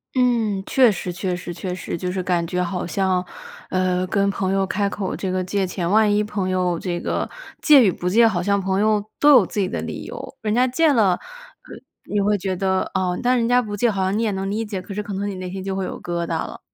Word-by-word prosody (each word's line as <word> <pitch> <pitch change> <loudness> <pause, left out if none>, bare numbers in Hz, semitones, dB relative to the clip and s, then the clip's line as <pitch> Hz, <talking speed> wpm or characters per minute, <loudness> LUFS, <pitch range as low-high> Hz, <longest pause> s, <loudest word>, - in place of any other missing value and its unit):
嗯， 230 -6 +1
确 255 -5 +4
实 185 -2 -4
确 180 0 -2
实 175 -1 -6
确 180 +2 -4
实。 175 - -5
就 180 +1 -3
是 185 -1 -2
感 175 -2 0
觉 180 +1 -1
好 180 0 -3
像， 185 0 0 0.5
呃， 185 0 +1
跟 200 +1 +1
朋 195 -1 -1
友 195 0 +2
开 200 +1 -1
口 195 -2 -3
这 190 - -3
个 185 0 -1
借 190 0 -1
钱， 175 -1 -3
万 215 +1 +4
一 210 +1 +2
朋 200 -3 -3
友 180 -2 0
这 175 -2 -3
个 - - -2 0.3
借 290 -4 +7
与 195 - +4
不 180 - -5
借， 230 +4 +5
好 180 -5 0
像 200 +2 +1
朋 190 0 0
友 210 -1 +2 0.2
都 295 0 +6
有 245 -8 +7
自 205 - -4
己 190 - +1
的 - - -3
理 - - -6
由。 - - -8
人 215 -1 -1
家 250 - +4
借 310 +4 +3
了， 210 -6 +4
呃， - - -4 0.9
你 210 - -1
会 205 +1 +2
觉 190 0 -2
得， 190 0 0
哦 185 -2 0
但 250 +1 +2
人 230 -1 +1
家 245 +1 +4
不 210 -3 -5
借， 225 +2 +2
好 195 -1 -1
像 190 +3 0
你 230 - 0
也 215 - +1
能 195 0 -3
理 215 +3 -1
解， 200 -3 -4
可 200 - -8
是 210 +1 -3
可 200 - -6
能 200 +1 -2
你 195 - -5
内 185 -1 -6
心 190 0 -5
就 195 0 -3
会 190 -1 -2
有 - - -6
疙 170 -1 -2
瘩 - - -9 0.2
了。 - - -10
195 Hz, 285 characters per minute, -22 LUFS, 185-210 Hz, 0.9 s, 借